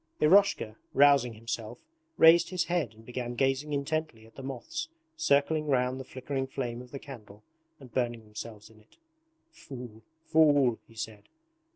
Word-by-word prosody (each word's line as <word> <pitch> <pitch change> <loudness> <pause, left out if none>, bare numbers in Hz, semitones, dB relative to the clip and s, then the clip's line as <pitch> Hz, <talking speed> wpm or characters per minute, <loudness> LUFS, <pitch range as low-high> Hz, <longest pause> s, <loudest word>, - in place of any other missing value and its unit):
Eroshka, 155 - +4 0.2
rousing 140 -4 +5
himself, 110 0 -5 0.4
raised 165 +1 +7
his 180 -2 0
head 160 - -1
and 110 +1 -17
began 120 0 -5
gazing 135 +3 0
intently 145 -5 -2
at 115 - -19
the - - -10
moths 320 - -5 0.3
circling 155 - +2
round 130 -1 +1
the - - -5
flickering 135 +1 -4
flame 120 -3 -4
of 125 - -13
the 140 - -7
candle 110 -7 -12 0.4
and 130 -5 -14
burning 120 -2 -1
themselves 105 0 -9
in 110 - -19
it. 105 - -26 0.5
'Fool, 120 - -10 0.2
fool!' 145 -7 +4
he 115 - -19
said. 110 -2 -7
130 Hz, 155 wpm, -29 LUFS, 115-145 Hz, 0.5 s, raised